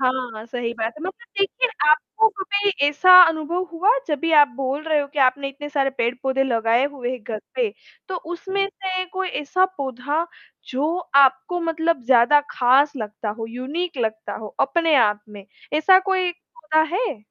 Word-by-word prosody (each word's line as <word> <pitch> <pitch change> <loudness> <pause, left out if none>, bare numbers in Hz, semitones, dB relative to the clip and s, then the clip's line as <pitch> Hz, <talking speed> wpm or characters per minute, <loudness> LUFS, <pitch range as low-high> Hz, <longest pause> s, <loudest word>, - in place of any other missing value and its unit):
हाँ, 255 -4 -2
सही 235 -1 -4
बात 225 0 -3
है। 310 - -10
मतलब 375 +2 -4 0.3
देखिए, - - +1 0.2
आपको 435 +9 +2
कभी 405 +1 0 0.2
ऐसा 365 +6 +4 0.2
अनुभव 325 +3 -2
हुआ 370 +6 +2 0.2
जब 295 -2 -1
भी 330 - -1
आप 295 -2 +7
बोल 275 +2 -3
रहे 310 -2 +1
हो 285 - -3
कि 295 - -5
आपने 275 +2 0
इतने 290 +2 -9
सारे 275 -2 0
पेड़-पौधे 260 +3 0
लगाए 230 0 +1
हुए 250 -3 -4
है 255 - -4
घर 220 -1 -6 0.2
पे। - - 0 0.4
तो 375 - -3 0.2
उसमें 390 +3 -2
से 375 -2 -4
कोई 375 -1 -2
ऐसा 370 +6 +1
पौधा 280 +5 -2 0.4
जो 300 +7 -1 0.3
आपको 265 +7 -1
मतलब 325 -4 -1
ज़्यादा 255 +4 +5
ख़ास 265 +4 +3
लगता 215 -1 -6
हो, 225 - -4
यूनिक 285 +8 -5
लगता 220 0 -4
हो, 215 -1 -9
अपने 330 +2 +2
आप 210 -4 +2
में? 205 -2 -12 0.3
ऐसा 315 +5 +5
कोई 370 -2 +1
पौधा 315 -2 -2
है? 415 - -2
290 Hz, 175 wpm, -21 LUFS, 250-350 Hz, 0.4 s, आप